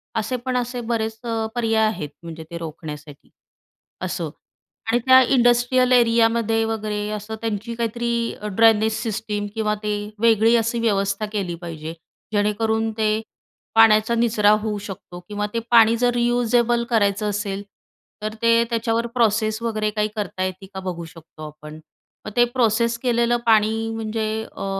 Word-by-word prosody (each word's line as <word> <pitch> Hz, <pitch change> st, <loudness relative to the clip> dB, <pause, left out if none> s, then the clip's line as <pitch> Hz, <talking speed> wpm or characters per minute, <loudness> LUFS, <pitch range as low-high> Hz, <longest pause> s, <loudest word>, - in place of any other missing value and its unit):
असे 225 Hz, +3 st, -1 dB
पण 255 Hz, -1 st, 0 dB
असे 245 Hz, 0 st, -3 dB
बरेच 225 Hz, -1 st, -2 dB
अ, 225 Hz, -1 st, -2 dB
पर्याय 225 Hz, -2 st, +2 dB
आहेत, 155 Hz, -9 st, -4 dB
म्हणजे 165 Hz, -1 st, -8 dB
ते 170 Hz, -, -5 dB
रोखण्यासाठी, 150 Hz, -3 st, -9 dB, 0.7 s
असं. -, -, -3 dB, 0.6 s
आणि 240 Hz, -, +3 dB
त्या 260 Hz, 0 st, +8 dB
इंडस्ट्रियल 245 Hz, 0 st, +3 dB
एरियामध्ये 230 Hz, -2 st, +3 dB
वगैरे 210 Hz, -2 st, -3 dB
असं, 215 Hz, +2 st, -7 dB
त्यांची 225 Hz, +1 st, -3 dB
काहीतरी 235 Hz, +1 st, -2 dB, 0.4 s
ड्रेनेज 220 Hz, -1 st, +4 dB
सिस्टीम 215 Hz, -2 st, -3 dB
किंवा 215 Hz, -1 st, 0 dB
ते 210 Hz, 0 st, -1 dB, 0.3 s
वेगळी 225 Hz, 0 st, +4 dB
अशी 230 Hz, +1 st, 0 dB
व्यवस्था 200 Hz, -2 st, 0 dB
केली 185 Hz, -5 st, -2 dB
पाहिजे 160 Hz, -1 st, -6 dB, 0.4 s
जेणेकरून 220 Hz, +2 st, +1 dB
ते 215 Hz, 0 st, +1 dB, 0.5 s
पाण्याचा 225 Hz, +1 st, +5 dB
निचरा 225 Hz, -3 st, +3 dB
होऊ 215 Hz, -1 st, -2 dB
शकतो 185 Hz, -3 st, -9 dB
किंवा 205 Hz, 0 st, -2 dB
ते 230 Hz, -, 0 dB
पाणी 230 Hz, -1 st, +6 dB
जर 245 Hz, 0 st, +2 dB
रियूजेबल 240 Hz, 0 st, +2 dB
करायचं 210 Hz, -2 st, +1 dB
असेल, 200 Hz, -1 st, -3 dB, 0.6 s
तर 215 Hz, 0 st, -3 dB
ते 230 Hz, 0 st, +4 dB
त्याच्यावर 230 Hz, 0 st, 0 dB
प्रोसेस 220 Hz, -1 st, +1 dB
वगैरे 215 Hz, -2 st, -1 dB
काही 210 Hz, 0 st, 0 dB
करता 195 Hz, -3 st, -3 dB
येते 185 Hz, +1 st, -4 dB
का 190 Hz, -, -5 dB
बघू 175 Hz, -3 st, -5 dB
शकतो 160 Hz, -1 st, -14 dB
आपण. 150 Hz, +1 st, -11 dB, 0.5 s
मग -, -, -5 dB
ते 240 Hz, -, +6 dB
प्रोसेस 235 Hz, -1 st, +1 dB
केलेलं 240 Hz, -1 st, +1 dB
पाणी, 225 Hz, 0 st, +3 dB
म्हणजे 220 Hz, 0 st, -3 dB, 0.3 s
अ, -, -, -4 dB
220 Hz, 145 wpm, -22 LUFS, 205-235 Hz, 0.7 s, त्या